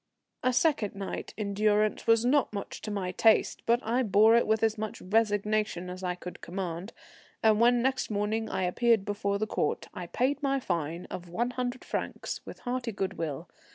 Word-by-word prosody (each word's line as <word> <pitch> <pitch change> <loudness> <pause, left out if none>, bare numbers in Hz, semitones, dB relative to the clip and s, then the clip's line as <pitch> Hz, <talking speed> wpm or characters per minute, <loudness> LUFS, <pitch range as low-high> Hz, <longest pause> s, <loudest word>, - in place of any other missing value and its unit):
A 255 - +2
second 245 -7 +1
night 195 -1 -5
in 205 -2 -2
durance 210 +1 +2
was 225 +1 +4
not 275 +1 +3
much 200 -1 -6
to - - -5
my 195 -3 -2
taste, 220 +4 +3
but 235 +1 +4
I 235 +4 +1
bore 220 0 +5
it 235 - +3
with 220 +1 +2
as 220 -1 +3
much 215 -1 -5
resignation 210 -2 0
as 185 +1 -8
I 180 -1 -2
could 180 0 -9
command; 180 +2 -5 0.5
and 215 -1 +5
when 240 0 +5
next 260 0 0
morning 215 +1 -1
I 190 - -1
appeared 220 +3 +2
before 200 -1 -1
the 215 - -1
Court, - - -1
I 180 -3 -6
paid 265 - 0
my 275 -1 +1
fine 170 - -3
of 175 -1 -6
one 240 +8 -1
hundred 250 0 -3
francs - - -4
with - - -9
hearty 245 -1 -2
good 195 -2 -3
will. 160 0 -3
215 Hz, 190 wpm, -29 LUFS, 190-235 Hz, 0.5 s, bore